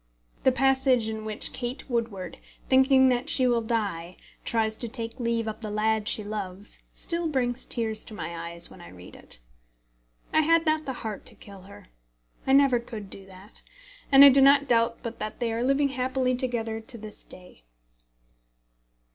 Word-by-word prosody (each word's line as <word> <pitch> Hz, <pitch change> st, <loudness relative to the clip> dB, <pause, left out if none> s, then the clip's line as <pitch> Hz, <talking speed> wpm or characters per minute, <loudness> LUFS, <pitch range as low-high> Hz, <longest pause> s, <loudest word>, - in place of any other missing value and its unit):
The 260 Hz, -, +4 dB
passage 265 Hz, -3 st, +3 dB
in 220 Hz, 0 st, -5 dB
which 215 Hz, -1 st, -1 dB
Kate 245 Hz, +1 st, -5 dB
Woodward, 225 Hz, -8 st, -3 dB, 0.3 s
thinking 265 Hz, 0 st, +5 dB
that 250 Hz, +3 st, 0 dB
she 260 Hz, -, +2 dB
will 240 Hz, -2 st, +2 dB
die, 200 Hz, -7 st, -2 dB, 0.3 s
tries 220 Hz, -1 st, 0 dB
to 240 Hz, -, -3 dB
take 230 Hz, 0 st, -5 dB
leave 230 Hz, -1 st, -1 dB
of 215 Hz, 0 st, -4 dB
the 220 Hz, -2 st, -5 dB
lad 215 Hz, 0 st, 0 dB
she 215 Hz, -, +3 dB
loves, 205 Hz, -1 st, -6 dB
still 340 Hz, -1 st, -2 dB
brings 255 Hz, -4 st, -1 dB
tears 220 Hz, -2 st, -2 dB
to 215 Hz, -, -7 dB
my 170 Hz, -4 st, -5 dB
eyes 170 Hz, 0 st, -2 dB
when -, -, -13 dB
I 85 Hz, -, -11 dB
read 90 Hz, 0 st, -13 dB
it. -, -, -5 dB, 1.0 s
I 315 Hz, -, +5 dB
had 330 Hz, +2 st, +3 dB
not 310 Hz, -1 st, +1 dB
the 265 Hz, -, -3 dB
heart 215 Hz, -2 st, -4 dB
to -, -, -6 dB
kill 200 Hz, -2 st, -13 dB
her. 195 Hz, -, -15 dB, 0.6 s
I 265 Hz, -, +4 dB
never 275 Hz, -3 st, +5 dB
could 220 Hz, -4 st, -9 dB
do 195 Hz, -1 st, -9 dB
that. 190 Hz, +2 st, -15 dB, 0.5 s
And 275 Hz, 0 st, +10 dB
I -, -, +11 dB
do 275 Hz, +1 st, +5 dB
not 280 Hz, +1 st, +6 dB
doubt 230 Hz, -1 st, +2 dB
but 230 Hz, -1 st, -6 dB
that 215 Hz, 0 st, -5 dB
they 235 Hz, -2 st, -1 dB
are 230 Hz, -, -2 dB
living 275 Hz, +2 st, +2 dB
happily 255 Hz, -1 st, 0 dB
together 235 Hz, -3 st, -3 dB
to 235 Hz, +2 st, -8 dB
this 215 Hz, -1 st, -9 dB
day. 180 Hz, -, -9 dB
230 Hz, 180 wpm, -26 LUFS, 215-260 Hz, 1.0 s, I